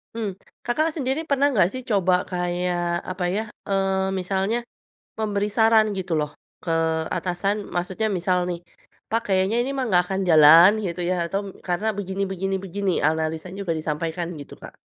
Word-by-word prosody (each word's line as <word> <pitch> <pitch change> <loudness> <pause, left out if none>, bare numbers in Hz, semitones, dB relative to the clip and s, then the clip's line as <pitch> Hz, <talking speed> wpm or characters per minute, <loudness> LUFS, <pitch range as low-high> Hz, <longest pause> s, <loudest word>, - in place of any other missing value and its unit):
Mmm, 205 -4 -4 0.2
Kakak 310 +6 0
sendiri 290 +2 -2
pernah 280 0 +2
nggak 190 -9 +4
sih 255 0 -5
coba 185 -5 +2
kayak 175 -1 -1
apa 185 -1 -3
ya, 215 - 0 0.3
eee, 195 -1 +1
misalnya 195 +4 0 0.6
memberi 210 -1 -1
saran 220 0 +4
gitu 185 -2 -3
loh, 150 -1 -1 0.3
ke - - -6 0.5
atasan, 195 +4 -2
maksudnya 185 +5 -1
misal 180 0 +1
nih, 175 -1 -3 0.5
"Pak 230 +2 +1
kayaknya 190 +3 +2
ini 250 - -2
mah 265 -2 -1
nggak 180 -3 +4
akan 190 +1 -2
jalan 160 +3 +9
gitu 175 0 -3
ya, 185 - +1
atau 195 +4 -1 0.3
karena 180 +5 -1
begini 195 0 -2
begini 195 +1 -2
begini." 195 +1 -2
Analisanya 160 +3 -1
juga 170 - 0
disampaikan 160 +2 -3
gitu, 145 - -10
Kak. - - -10
190 Hz, 160 wpm, -23 LUFS, 175-210 Hz, 0.6 s, jalan